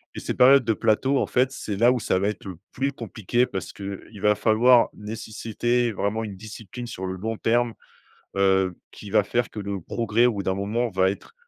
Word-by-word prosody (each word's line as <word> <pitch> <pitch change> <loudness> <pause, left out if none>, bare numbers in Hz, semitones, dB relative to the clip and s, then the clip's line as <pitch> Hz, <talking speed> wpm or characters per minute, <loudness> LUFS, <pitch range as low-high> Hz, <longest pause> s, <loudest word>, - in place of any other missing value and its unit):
et - - -4
ces - - -3
périodes 130 0 +6
de 115 - +2
plateau, 115 +6 +1
en - - 0
fait, 130 +1 +2
c'est 110 -7 -5
là 120 +4 +5
où 125 - 0
ça 105 -4 0
va 100 +2 +1
être 105 - -7
le 95 -2 -6 0.2
plus 135 +2 -1
compliqué 120 -1 -1
parce 95 -6 -5
qu'il 100 +1 -8
va 105 0 +4
falloir 115 +3 +4
nécessiter 115 +2 -2
vraiment 105 +2 -2
une 105 -3 -6
discipline 110 +3 -9
sur 95 -4 -6
le 95 - -3
long 110 +3 -4
terme, 120 0 +1 0.6
heu, 95 -2 +2 0.2
qui 105 - -11
va 105 0 +3
faire 120 +4 -1
que 105 - -8
le 100 -2 -4
progrès, 115 +5 +1
au 120 - +1
bout 100 -2 -4
d'un 95 - 0
moment, 110 +5 -1
va 95 0 +3
être 100 - -7
110 Hz, 215 wpm, -24 LUFS, 100-120 Hz, 0.6 s, périodes